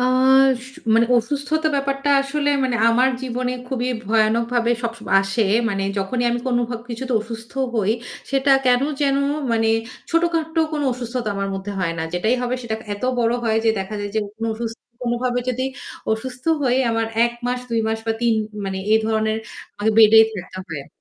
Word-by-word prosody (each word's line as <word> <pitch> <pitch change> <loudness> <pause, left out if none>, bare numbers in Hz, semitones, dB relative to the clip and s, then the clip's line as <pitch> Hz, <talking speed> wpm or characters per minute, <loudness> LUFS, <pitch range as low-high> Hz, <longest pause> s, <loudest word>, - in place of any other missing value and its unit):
আ - - +1
আস 260 0 +4 0.3
মানে 230 0 +4
অসুস্থতা 290 +6 0
ব্যাপারটা 275 +1 -1
আসলে 290 +1 -1 0.2
মানে 245 -2 0
আমার 250 +3 +4
জীবনে 250 0 -2 0.2
খুবই 250 -1 -1 0.2
ভয়ানকভাবে 230 +2 +2
সবসময় 230 -3 -3
আসে, 195 +3 0 0.3
মানে 195 -2 -1 0.2
যখনই 240 +6 -1
আমি 240 - 0
কোনভব 240 -2 0
কিছুতে 250 +2 -4
অসুস্থ 225 +1 -8 0.2
হই 215 -1 +2 0.4
সেটা 275 +1 +2 0.2
কেন 250 0 +4 0.2
যেন 275 -1 +2 0.4
মানে 225 -1 +2 0.4
ছোটখাটো 330 -1 +1
কোন 295 - -1
অসুস্থতা 240 -2 -4
আমার 195 0 -2
মধ্যে 195 +1 -5
হয় 170 -2 0
না। - - -1
যেটাই 220 +7 +1
হবে 245 0 -1
সেটা 225 -2 -3 0.2
এত 205 - -12 0.2
বড় 230 -1 +2
হয় 220 -1 +2
যে - - +4
দেখা 195 +2 -4
যায় 205 - -3
যে - - +2 0.2
কোন 225 - -4
অসুস 230 0 -4 0.3
কোনভাবেই 245 0 -1
যদি 255 +1 -2 0.5
অসুস্থ 250 +3 -5 0.2
হই 250 -2 +2
আমার 225 0 0 0.2
১ 235 - 0
মাস 250 0 0
২ 230 -1 +1
মাস 220 0 -1
বা 225 - +2
৩ 235 -1 +3 0.3
মানে 190 0 -3
এ - - +7
ধরনের 220 0 +1 0.6
বেডেই 220 0 +8 0.3
থাকতে 185 - -7 0.2
হয়। 140 - -9
235 Hz, 170 wpm, -21 LUFS, 220-255 Hz, 0.6 s, বেডেই